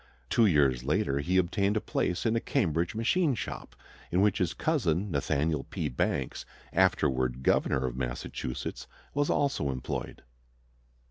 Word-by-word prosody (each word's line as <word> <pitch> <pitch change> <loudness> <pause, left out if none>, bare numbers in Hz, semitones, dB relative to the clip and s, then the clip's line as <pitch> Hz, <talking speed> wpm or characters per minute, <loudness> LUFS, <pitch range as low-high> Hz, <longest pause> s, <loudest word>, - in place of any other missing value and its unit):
Two 115 -2 +5
years 70 -8 +3
later 70 -1 +1
he 90 +6 +1
obtained 100 +3 +2
a - - +3
place 90 -2 -1
in 115 0 +2
a - - +3
Cambridge 85 - 0
machine 140 +6 +2
shop, - - -6 0.4
in 90 - +2
which 100 -1 +3
his 90 -1 0
cousin, 100 - 0
Nathaniel 70 0 0
P. 75 - -3
Banks, 60 - -1 0.3
afterward 65 -1 +2
governor 65 0 +2
of - - -3
Massachusetts, 65 0 -4 0.3
was 145 0 +1
also 140 - +1
employed. 65 -1 -4
85 Hz, 140 wpm, -29 LUFS, 70-110 Hz, 0.4 s, Two